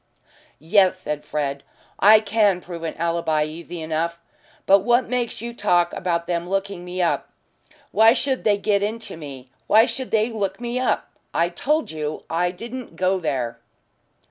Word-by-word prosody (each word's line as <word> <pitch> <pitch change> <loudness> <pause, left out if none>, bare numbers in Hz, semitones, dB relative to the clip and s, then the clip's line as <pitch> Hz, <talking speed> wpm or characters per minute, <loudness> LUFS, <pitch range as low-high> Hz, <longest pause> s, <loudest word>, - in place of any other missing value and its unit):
"Yes," 185 +3 +3
said 150 -4 -4
Fred, 140 -2 -2 0.4
"I 215 +2 +7
can 205 -3 +2
prove 175 -2 -8
an 165 - -4
alibi 165 -2 +1
easy 165 +2 -7
enough. 165 +2 -1 0.5
But 195 +1 +6
what 240 +5 +2
makes 245 -2 -2
you 235 0 -5
talk 175 -6 +2
about 170 -2 -1
them 170 0 -2
looking 195 -2 -2
me 180 0 -2
up? 170 - 0 0.6
Why 220 +2 +6
should 265 0 -1
they 205 -2 +3
get 200 0 +1
into 220 +1 -3
me 135 -5 -10 0.2
why 220 +2 +6
should 255 +1 -4
they 220 +1 +2
look 195 -3 -2
me 240 +1 -2
up? 255 - 0 0.2
I've 170 +1 +1
told 300 - 0
you 155 -1 -4
I 175 +2 +1
didn't 230 +2 -8
go 185 +2 +1
there." 125 -8 -2
185 Hz, 165 wpm, -23 LUFS, 165-220 Hz, 0.6 s, I